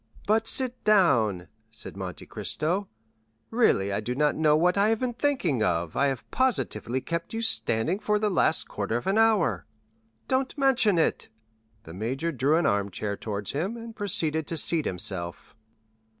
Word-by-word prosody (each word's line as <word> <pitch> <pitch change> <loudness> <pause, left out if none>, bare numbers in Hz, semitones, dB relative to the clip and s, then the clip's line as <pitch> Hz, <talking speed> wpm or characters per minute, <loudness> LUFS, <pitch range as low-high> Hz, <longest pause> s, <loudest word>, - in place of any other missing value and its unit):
"But 220 +2 +2
sit 255 0 0
down," 115 - +3 0.2
said 115 -3 -2
Monte 95 -3 -6
Cristo; 180 +6 -2 0.6
"really 100 - +2
I - - 0
do 120 +4 -4
not 150 +1 +2
know 155 -1 +3
what 180 +3 +2
I 200 +2 +3
have 225 -1 +1
been 255 -1 -2
thinking 235 - 0
of—I 85 - +1
have 135 -3 -4
positively 230 - 0
kept 170 - -4
you 225 - -2
standing 170 - +1
for 210 0 +1
the 210 0 0
last 160 -3 +1
quarter 105 +3 -2
of 120 - -6
an 195 +3 +2
hour." 205 - +2 0.6
"Don't 260 +2 -1
mention 250 -8 +3
it." 160 - 0 0.5
The 80 - -11
major 130 - -2
drew 140 +2 +1
an 170 - +1
armchair 100 0 -1
towards 105 -1 -5
him, 185 +11 -3
and 230 -1 -9
proceeded 160 -7 -1
to 165 - -1
seat 160 0 +3
himself. 85 -2 -3
160 Hz, 165 wpm, -26 LUFS, -, 0.6 s, down